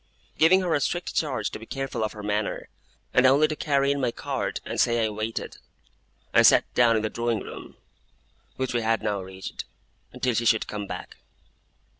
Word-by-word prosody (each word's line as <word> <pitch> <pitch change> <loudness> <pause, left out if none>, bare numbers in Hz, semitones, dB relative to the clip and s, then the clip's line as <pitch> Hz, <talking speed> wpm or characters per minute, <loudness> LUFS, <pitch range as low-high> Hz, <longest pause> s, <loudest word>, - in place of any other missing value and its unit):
Giving 180 +4 +5
her 175 -3 0
a 145 - +1
strict 175 +5 -2
charge 145 -5 -1
to - - -7
be 115 - -11
careful 135 -4 -3
of 110 - -2
her 105 - -9
manner, 105 0 -2 0.4
and 125 +1 +5
only 140 +4 +5
to 155 - -3
carry 140 -2 +1
in 140 0 -1
my 125 - +2
card - - -3
and - - -4
say 120 -1 +2
I - - 0
waited, 110 +2 -4 0.8
I - - +7
sat - - +7
down 120 -2 +4
in 110 - 0
the 110 - 0
drawing 115 -2 -1
room - - -10 0.8
(which 130 -1 -2
we 120 - +1
had 115 0 0
now 105 -2 -1
reached) 95 0 -7 0.5
until 125 -1 -1
she 115 +1 0
should 110 -1 +3
come 105 -1 -5
back. - - -7
120 Hz, 195 wpm, -26 LUFS, 110-140 Hz, 0.8 s, I